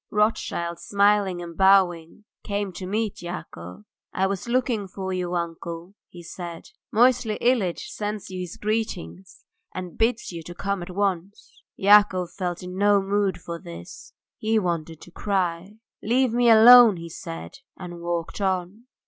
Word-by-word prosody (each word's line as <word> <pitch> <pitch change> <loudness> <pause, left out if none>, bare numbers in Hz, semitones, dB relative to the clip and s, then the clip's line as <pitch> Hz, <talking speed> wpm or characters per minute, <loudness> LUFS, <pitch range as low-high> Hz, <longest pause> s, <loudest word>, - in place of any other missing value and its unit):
Rothschild, 175 -5 -1
smiling 200 -3 +2
and 170 -1 -9
bowing, 190 -1 +3 0.2
came 200 -2 -3
to 185 +1 -7
meet 215 +1 -2
Yakov. 105 - -8 0.3
"I 190 - 0
was 195 +3 -3
looking 235 -4 0
for 190 0 -5
you, 180 -1 -2
uncle," 170 +1 -5 0.2
he 175 -1 -12
said. 170 0 -8 0.2
"Moisey 240 -2 +3
Ilyitch 230 -8 0
sends 210 -2 -5
you 185 - -5
his 180 -2 -6
greetings 205 - -4 0.3
and 180 -2 -7
bids 230 -1 0
you 170 -1 -7
come 195 +4 -4
to 175 - -6
him - - -13
at 180 - -9
once." 195 -1 -3
Yakov 195 -3 +4
felt 180 -2 -4
in 180 +1 -7
no 205 0 +4
mood 195 -2 0
for 170 0 -7
this. 85 - -11 0.3
He 220 +1 +1
wanted 165 -5 -2
to 175 - -13
cry. 190 0 -2 0.2
"Leave 245 +2 +1
me 240 0 +3
alone," 230 -2 +9
he 170 0 -8
said, 165 +10 -8 0.2
and 175 -2 -8
walked 170 +3 -3
on. 190 +3 -2
190 Hz, 155 wpm, -24 LUFS, 175-210 Hz, 0.3 s, alone